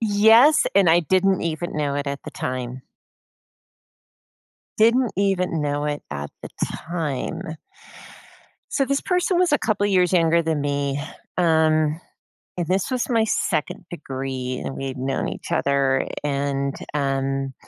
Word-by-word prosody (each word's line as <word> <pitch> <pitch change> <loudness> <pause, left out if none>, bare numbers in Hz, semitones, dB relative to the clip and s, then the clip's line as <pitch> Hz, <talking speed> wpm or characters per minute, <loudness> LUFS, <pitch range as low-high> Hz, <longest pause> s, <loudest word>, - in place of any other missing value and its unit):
Yes, 225 +7 +6
and 195 -3 +5
I 170 +2 +5
didn't 185 +3 +2
even 170 +1 -3
know 145 -2 0
it 145 - -3
at 140 0 -4
the - - -8
time. 125 0 -4 2.0
Didn't 230 +2 +4
even 185 -4 +1
know 145 0 -1
it 145 0 -3
at 70 0 -4
the - - -6
time. 160 -1 -4 1.1
So 275 - +1
this 275 +1 0
person 360 -1 +1
was 360 -4 +3
a - - +5
couple 210 -5 0
years 185 -3 +3
younger 170 -1 +4
than 160 -2 -1
me, 140 -1 -1 0.4
um, 160 -2 +3 0.6
and 175 -2 -2
this 190 +8 0
was 255 0 -1
my 225 -2 +3
2nd 175 -5 -1
degree, 130 -5 -4
and - - -5
we 135 - -4
had 130 0 -5
known 135 +1 -2
each - - -8
other, 135 -1 +2 0.2
and, 140 -1 -1 0.2
um 135 -1 -1
160 Hz, 145 wpm, -23 LUFS, 140-195 Hz, 2.0 s, Yes